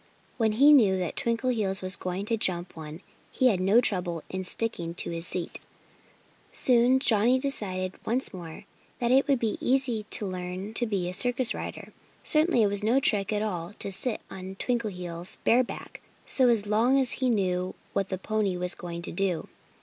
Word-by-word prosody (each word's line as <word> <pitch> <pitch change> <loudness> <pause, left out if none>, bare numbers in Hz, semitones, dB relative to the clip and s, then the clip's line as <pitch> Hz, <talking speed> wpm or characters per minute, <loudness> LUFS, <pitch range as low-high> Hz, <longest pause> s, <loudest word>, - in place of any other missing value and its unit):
When 220 -3 +1
he 280 +7 +6
knew 205 -9 +5
that 180 -3 -3
Twinkleheels 230 -5 0
was 185 +1 +5
going 185 +2 -4
to 230 - 0
jump 180 -5 -2
one 160 +1 -9 0.3
he 255 - +3
had 195 -6 0
no 195 +5 +4
trouble 180 -8 -1
in 185 0 -4
sticking 180 -4 -2
to - - -2
his 165 0 -1
seat. 175 -2 -3 0.9
Soon 250 +1 +4
Johnnie 235 0 +4
decided 190 -9 -2
once 250 +4 -1
more 170 -3 -9 0.3
that 240 0 -1
it 270 +3 +4
would 280 -2 +3
be 225 -3 -2
easy 250 -5 +2
to 210 - -2
learn 185 +2 -5
to 240 +1 0
be 195 -4 -2
a 180 - -4
circus 245 +4 +2
rider. - - -8 0.3
Certainly 305 -6 +2
it - - +3
was 200 0 0
no 230 +5 +2
trick 205 -7 +1
at 210 0 -1
all 180 -3 -4
to 200 - -6
sit 225 +5 -2
on 190 0 -8
Twinkleheels' 180 -7 -3
bare 245 +2 +4
back - - -9 0.2
so 255 -3 +3
long 230 +6 +2
as 260 -2 +3
he 260 -1 -1
knew 185 -4 -1 0.2
what 195 -1 -1
the 190 - -3
pony 205 -1 -1
was 180 0 +2
going 170 -1 -7
to - - -7
do. 180 -2 -2
205 Hz, 185 wpm, -27 LUFS, 185-240 Hz, 0.9 s, he